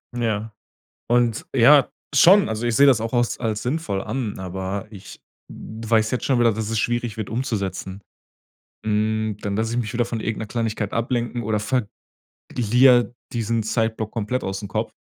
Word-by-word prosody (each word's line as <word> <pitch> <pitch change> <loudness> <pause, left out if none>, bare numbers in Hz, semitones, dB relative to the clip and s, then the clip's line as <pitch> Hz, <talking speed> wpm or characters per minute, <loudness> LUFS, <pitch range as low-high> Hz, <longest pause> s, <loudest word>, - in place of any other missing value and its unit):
Ja. 110 -2 -2 0.6
Und 120 -2 +2
ja 135 +3 +6 0.2
schon, 185 - +6
also 110 +2 -3
ich 120 -1 0
seh 140 - +6
das 130 -6 +5
auch 115 +1 -4
aus 120 -1 0
als 110 -3 -2
sinnvoll 125 -7 -2
an, 120 -8 -4
aber 95 +3 -4
ich 100 -1 -12 0.3
w 110 0 -9
weiß 110 -2 +3
jetzt 125 - -2
schon 130 -3 +2
wieder, 115 -2 +4
dass 110 0 -3
es 115 - -1
schwierig 120 -2 -1
wird 110 - -4
umzusetzen. 100 -5 -3 0.8
Hm, 110 0 0
dann 100 -1 -2
lass 110 +1 -1
ich 120 - -2
mich 110 -4 -2
wieder 120 0 +1
von 115 -2 -4
irgend 115 -1 -3
'ner - - -3
Kleinigkeit 110 -2 -2
ablenken 120 0 -1
oder 105 0 0
verg 115 0 -1 0.7
lier 120 +1 +4 0.2
diesen 115 -1 -1
Zeitblock 110 -1 -1
komplett 115 +3 -2
ausm 95 +1 -4
Kopf, 110 +3 -3
115 Hz, 175 wpm, -22 LUFS, 105-120 Hz, 0.8 s, ja